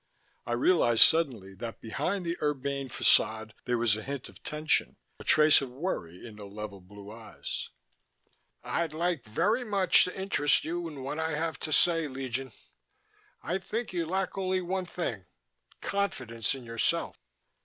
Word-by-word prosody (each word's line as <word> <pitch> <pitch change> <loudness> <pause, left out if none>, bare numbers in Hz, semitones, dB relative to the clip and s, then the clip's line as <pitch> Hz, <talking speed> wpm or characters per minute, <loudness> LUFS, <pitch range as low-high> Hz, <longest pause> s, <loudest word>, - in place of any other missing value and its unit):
I 120 - -1
realized 120 -3 +5
suddenly 125 - +3
that 115 +4 -7
behind 180 - -2
the 170 0 -1
urbane 140 -2 -1
façade 110 -2 +3
there 125 -1 +1
was 115 -3 +3
a 110 - -5
hint 135 +2 -6
of - - -16
tension, 150 +1 0 0.2
a - - -8
trace 155 -1 +6
of 135 - -4
worry 125 - -4
in 105 -2 -12
the 105 - -9
level 100 -1 -7
blue 100 +2 -12
eyes. 115 0 -6 0.9
"I'd 165 -2 -1
like 170 -3 -1
very 200 - +1
much 200 -5 +4
to 180 +1 -6
interest 170 -7 +2
you 170 +1 -3
in 145 -5 -8
what 145 +4 -4
I 160 -1 -1
have 160 0 -2
to 155 - -5
say, 165 0 +3
Legion. 130 -1 -4 0.9
I 180 +3 -1
think 215 +3 -4
you 170 -2 -1
lack 190 +2 -2
only 185 0 +1
one 185 +1 -2
thing 115 - -4 0.6
confidence 130 - -2
in 130 - -9
yourself." 115 -1 -1
145 Hz, 160 wpm, -29 LUFS, 115-175 Hz, 0.9 s, trace